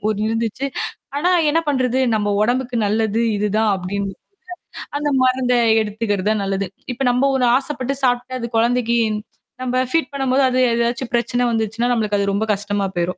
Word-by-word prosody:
ஒண்ணு 215 Hz, 0 st, -1 dB
இருந்துச்சு. 225 Hz, +4 st, -2 dB, 0.5 s
ஆனா 350 Hz, +5 st, +1 dB, 0.2 s
என்ன 330 Hz, +2 st, +2 dB
பண்றது? 260 Hz, -2 st, +1 dB, 0.2 s
நம்ம 205 Hz, -1 st, 0 dB
உடம்புக்கு 245 Hz, +2 st, 0 dB
நல்லது 220 Hz, +1 st, 0 dB, 0.2 s
இது 210 Hz, +1 st, 0 dB
தான் 220 Hz, -1 st, +2 dB
அப்பிடின்னு, 195 Hz, +1 st, -4 dB, 0.8 s
அந்த 295 Hz, 0 st, -1 dB
மருந்த 255 Hz, -1 st, +2 dB, 0.3 s
எடுத்துக்கிறது 210 Hz, -2 st, -2 dB
தான் 215 Hz, -1 st, 0 dB
நல்லது. 195 Hz, 0 st, -1 dB, 0.3 s
இப்ப 245 Hz, -, -11 dB
நம்ம 265 Hz, +3 st, +2 dB
ஒண்ணு 255 Hz, -, +2 dB
ஆசைப்பட்டு 270 Hz, -1 st, -2 dB
சாப்பிட்டு 250 Hz, +1 st, 0 dB
அது 235 Hz, -, -4 dB
குழந்தைக்கு 235 Hz, 0 st, +2 dB, 0.6 s
நம்ம 255 Hz, 0 st, -1 dB
ஃபீட் 330 Hz, +2 st, +1 dB
பண்ணும்போது 270 Hz, -1 st, +1 dB
அது 255 Hz, -, -1 dB
ஏதாவது 235 Hz, +2 st, 0 dB
பிரச்சன 240 Hz, +1 st, +1 dB
வந்துச்சுன்னா, 225 Hz, +1 st, -1 dB
நமக்கு 210 Hz, -3 st, 0 dB
அது 200 Hz, -, +1 dB
ரொம்ப 215 Hz, +2 st, 0 dB
கஷ்டமா 205 Hz, 0 st, -1 dB
போயிரும். 175 Hz, +1 st, -1 dB
235 Hz, 160 wpm, -20 LUFS, 210-255 Hz, 0.8 s, என்ன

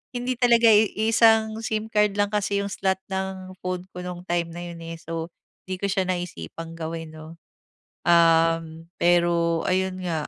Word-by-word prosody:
hindi 245 Hz, 0 st, -2 dB
talaga 235 Hz, -2 st, +5 dB
iisang 220 Hz, +1 st, +4 dB
SIM 220 Hz, 0 st, -3 dB
card 210 Hz, -2 st, +2 dB
lang 205 Hz, 0 st, +2 dB
kasi 200 Hz, -1 st, 0 dB
'yong 200 Hz, -, -4 dB
slot 190 Hz, 0 st, 0 dB
ng 190 Hz, -1 st, -4 dB
phone 185 Hz, -1 st, -3 dB
ko 180 Hz, -, -9 dB
no'ng 180 Hz, 0 st, -6 dB
time 175 Hz, -2 st, 0 dB
na 175 Hz, +1 st, -7 dB
'yon, 170 Hz, -1 st, -8 dB
eh. 165 Hz, 0 st, -6 dB
So, 165 Hz, 0 st, -5 dB, 0.4 s
'di 185 Hz, -, -1 dB
ko 200 Hz, -, 0 dB
siya 190 Hz, -1 st, 0 dB
naisipang 165 Hz, -, -5 dB
gawin 165 Hz, 0 st, -5 dB
'no. 155 Hz, +1 st, -11 dB, 0.7 s
Uhm, 165 Hz, -1 st, +3 dB
pero 170 Hz, -1 st, +2 dB
ayon 185 Hz, 0 st, 0 dB
nga, 160 Hz, -4 st, -2 dB
180 Hz, 165 wpm, -24 LUFS, 165-205 Hz, 0.7 s, talaga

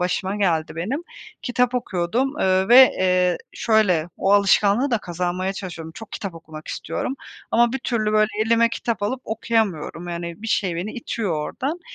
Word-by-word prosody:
başıma 185 Hz, +2 st, -1 dB
geldi 165 Hz, -5 st, 0 dB
benim, 225 Hz, -, -2 dB, 0.4 s
kitap 250 Hz, 0 st, +1 dB
okuyordum, 240 Hz, +5 st, -1 dB
eee, 190 Hz, +1 st, +2 dB
ve, 240 Hz, -, +8 dB, 0.2 s
eee 180 Hz, -1 st, +2 dB
şöyle, 190 Hz, -8 st, +2 dB
o 195 Hz, -, +1 dB
alışkanlığı 205 Hz, +5 st, +4 dB
da 235 Hz, -, +2 dB
kazanmaya 180 Hz, +1 st, -2 dB
çalışıyorum. 175 Hz, -5 st, -7 dB
Çok 225 Hz, -2 st, -10 dB
kitap 195 Hz, -4 st, -5 dB
okumak 155 Hz, -1 st, -11 dB
istiyorum 165 Hz, -, -3 dB, 0.4 s
ama 240 Hz, +1 st, +3 dB
bir 265 Hz, -, -1 dB
türlü, 220 Hz, -4 st, -1 dB
böyle, 215 Hz, 0 st, +4 dB, 0.2 s
elime 230 Hz, 0 st, +4 dB
kitap 230 Hz, -2 st, -3 dB
alıp 250 Hz, +5 st, -1 dB
okuyamıyorum, 210 Hz, -7 st, -1 dB
yani 170 Hz, +2 st, -6 dB
bir 225 Hz, -, -5 dB
şey 185 Hz, -5 st, 0 dB
beni 190 Hz, +6 st, -4 dB
itiyor 225 Hz, -5 st, -3 dB
oradan. 270 Hz, -, -3 dB
200 Hz, 160 wpm, -22 LUFS, 175-230 Hz, 0.4 s, ve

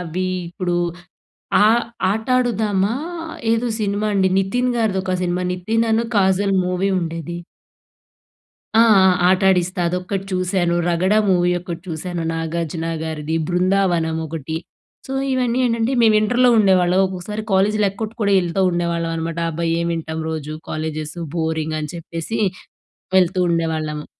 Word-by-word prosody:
అవి 180 Hz, +2 st, -3 dB, 0.2 s
ఇప్పుడు, 175 Hz, 0 st, -2 dB, 0.9 s
ఆహ్, 230 Hz, +2 st, +4 dB, 0.3 s
'ఆట 220 Hz, +2 st, -2 dB
ఆడుదామా' 215 Hz, -3 st, +1 dB, 0.6 s
ఏదో 230 Hz, +2 st, +1 dB
సినిమా 205 Hz, +1 st, -1 dB
అండి? 190 Hz, -1 st, +3 dB
నితిన్ 245 Hz, +6 st, 0 dB
గారిదోక 190 Hz, -5 st, 0 dB
సినిమా. 180 Hz, 0 st, -1 dB
నితిన్‌నను, 225 Hz, +4 st, 0 dB
కాజల్ 195 Hz, 0 st, +2 dB
మూవీ 180 Hz, +2 st, 0 dB
ఉండేది. 165 Hz, 0 st, -5 dB, 1.4 s
ఆ! 225 Hz, -, +6 dB, 0.2 s
ఆ! -, -, +7 dB, 0.2 s
'ఆట 185 Hz, +1 st, +3 dB
ఆడిస్తా' 180 Hz, 0 st, 0 dB
అదొక్కటి 180 Hz, +2 st, -3 dB
చూశాను, 185 Hz, -1 st, 0 dB
'రగడ' 185 Hz, +4 st, +2 dB
మూవీ 180 Hz, -1 st, +3 dB
ఒకటి 175 Hz, -2 st, -7 dB
చూశాను, 170 Hz, +1 st, -4 dB
నాగార్జున 165 Hz, 0 st, -3 dB, 0.2 s
గారిది. 160 Hz, 0 st, -3 dB
'బృందావనం' 180 Hz, -3 st, +1 dB
ఒకటి. 160 Hz, 0 st, -5 dB, 0.5 s
సో, 270 Hz, -, -4 dB, 0.2 s
ఇవన్నీ 250 Hz, -1 st, 0 dB
ఏంటంటే, 230 Hz, +2 st, 0 dB
మేము 220 Hz, -2 st, +5 dB
ఇంటర్‌లో 245 Hz, +3 st, +3 dB
ఉండేవాళ్ళం. 185 Hz, -3 st, +4 dB
ఒక్కోసారి, 190 Hz, +4 st, -5 dB
కాలేజీలేక్కొట్టు 210 Hz, +2 st, +1 dB
కూడా, 200 Hz, -, +2 dB
ఎళ్తా 175 Hz, +2 st, -1 dB
ఉండేవాళ్ళం 170 Hz, -1 st, -1 dB
అనమాట. 165 Hz, 0 st, -4 dB
అబ్బా! 165 Hz, +1 st, -3 dB
ఏం 170 Hz, -, -1 dB
వింటాం 160 Hz, -1 st, -4 dB
రోజు 155 Hz, -1 st, -4 dB, 0.2 s
కాలేజెసు, 155 Hz, +1 st, -4 dB, 0.2 s
బోరింగ్ 160 Hz, -1 st, -1 dB
అని 150 Hz, -, -5 dB
చెప్పేసి, 165 Hz, +5 st, -5 dB, 0.8 s
వెళ్తూ 185 Hz, 0 st, +3 dB
ఉండేవాళ్ళము. 160 Hz, -2 st, -2 dB
180 Hz, 125 wpm, -20 LUFS, 165-200 Hz, 1.4 s, ఆ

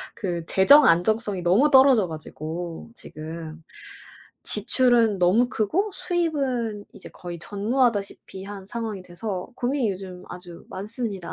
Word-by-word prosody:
그 175 Hz, -5 st, -4 dB
재정 280 Hz, +11 st, +6 dB
안정성이 195 Hz, +3 st, +2 dB
너무 205 Hz, +13 st, +3 dB
떨어져 265 Hz, -8 st, +6 dB
가지고 160 Hz, +3 st, -7 dB
지금. 160 Hz, -1 st, -9 dB, 0.9 s
지출은 230 Hz, -1 st, +3 dB
너무 190 Hz, +8 st, +3 dB
크고 315 Hz, -, 0 dB
수입은 270 Hz, -, -2 dB
이제 -, -, -11 dB
거의 175 Hz, -1 st, -8 dB
전무하다시피 205 Hz, -2 st, -1 dB
한 200 Hz, -1 st, -8 dB
상황이 220 Hz, -5 st, -5 dB
돼서 180 Hz, +1 st, -6 dB
고민이 250 Hz, -2 st, 0 dB
요즘 185 Hz, -1 st, -8 dB
아주 180 Hz, -1 st, -10 dB
많습니다. 205 Hz, -2 st, -5 dB
205 Hz, 285 characters per minute, -24 LUFS, 180-240 Hz, 0.9 s, 재정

